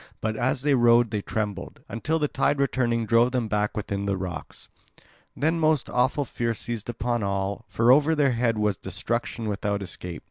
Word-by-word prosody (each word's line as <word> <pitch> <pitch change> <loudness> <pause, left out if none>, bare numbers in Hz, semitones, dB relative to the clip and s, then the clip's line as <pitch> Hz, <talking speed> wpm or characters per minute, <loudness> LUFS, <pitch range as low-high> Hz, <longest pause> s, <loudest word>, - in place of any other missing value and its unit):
But 110 0 -2
as 125 +2 -1
they 145 -1 +3
rowed 120 -2 +4
they 105 -2 -1
trembled, 105 -3 -4
until 155 +8 -1
the 150 -2 +1
tide 140 +1 0
returning 120 -4 +1
drove 120 +3 +3
them 125 -3 0
back 105 0 -1
within 100 -1 -3
the 100 -1 0
rocks. 90 -2 -7 0.7
Then 160 +3 +1
most 155 -3 +2
awful 130 +3 +1
fear 115 -2 -2
seized 115 0 -5
upon 120 0 -1
all; 100 +3 -2
for 115 +2 +4
over 150 +4 +5
their 145 -3 +3
head 115 -2 +1
was 105 -3 +1
destruction 115 +2 -3
without 100 -1 -2
escape. 90 -1 -7
115 Hz, 180 wpm, -25 LUFS, 105-130 Hz, 0.7 s, over